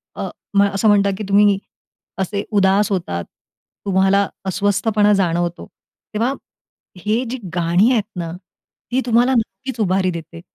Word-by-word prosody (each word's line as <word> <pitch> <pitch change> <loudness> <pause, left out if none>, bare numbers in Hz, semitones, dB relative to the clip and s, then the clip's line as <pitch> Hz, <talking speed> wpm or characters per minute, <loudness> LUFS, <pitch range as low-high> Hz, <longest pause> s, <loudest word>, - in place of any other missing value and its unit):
अ, - - -4 0.5
असं 205 +2 +1
म्हणतात, 200 -1 +4
की 215 - -5
तुम्ही 200 0 +5 0.6
असे 200 +1 -2
उदास 200 0 +3
होतात, 90 - -2 0.6
तुम्हाला 195 +1 +3 0.2
अस्वस्थपणा 205 +2 +2
जाणवतो, 175 -2 0 0.5
तेव्हा 230 +5 +1 0.7
हे 215 +6 0
जी 260 - -3 0.2
गाणी 175 +7 +3
आहेत 230 -5 +2
ना, 170 -2 -3 0.6
ती 255 +2 +2
तुम्हाला 245 +2 +3
नक्कीच 245 +2 -3
उभारी 185 -2 +1
देते. 165 0 -8
200 Hz, 125 wpm, -19 LUFS, 185-215 Hz, 0.7 s, तुम्ही